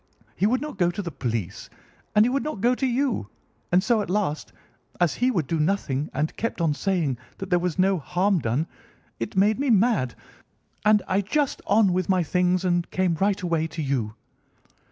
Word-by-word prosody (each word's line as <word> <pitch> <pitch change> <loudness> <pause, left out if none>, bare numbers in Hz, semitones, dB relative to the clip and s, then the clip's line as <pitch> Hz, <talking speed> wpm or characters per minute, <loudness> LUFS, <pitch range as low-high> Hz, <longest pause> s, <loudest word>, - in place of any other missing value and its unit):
He 200 - +2
would 255 +3 +1
not 300 -9 -6
go 175 -1 +3
to 185 +4 -4
the 170 - -5
police, 115 - -4 0.5
and 210 +1 +6
he - - +2
would 270 +2 0
not 300 -9 -4
go 240 +5 +3
to 265 +1 0
you, 245 - -1 0.4
and 180 +1 +4
so 230 -1 +2
at - - -5
last, 185 -6 -1 0.5
as 175 -5 +3
he 250 - +4
would 175 - 0
do 165 +3 -1
nothing 150 -4 0
and 150 +3 -2
kept 230 - -3
on 165 -3 +2
saying 160 -7 -1 0.2
that 195 0 -7
there 175 - +4
was 175 -1 -2
no 190 0 +3
harm 185 +5 +1
done, 125 +5 0 0.5
it 115 - -4
made 210 +4 +3
me 280 -1 0
mad, 210 - +2 0.7
and 210 -1 +4
I 190 +2 +2
just 280 +8 -1
on 200 -2 +4
with 185 0 -1
my 185 -2 +3
things 180 +2 +1
and 175 -1 +1
came 185 -2 +1
right 195 +4 +1
away 165 -2 0
to 160 +1 -6
you." 120 -6 -2
185 Hz, 200 wpm, -25 LUFS, 160-210 Hz, 0.7 s, and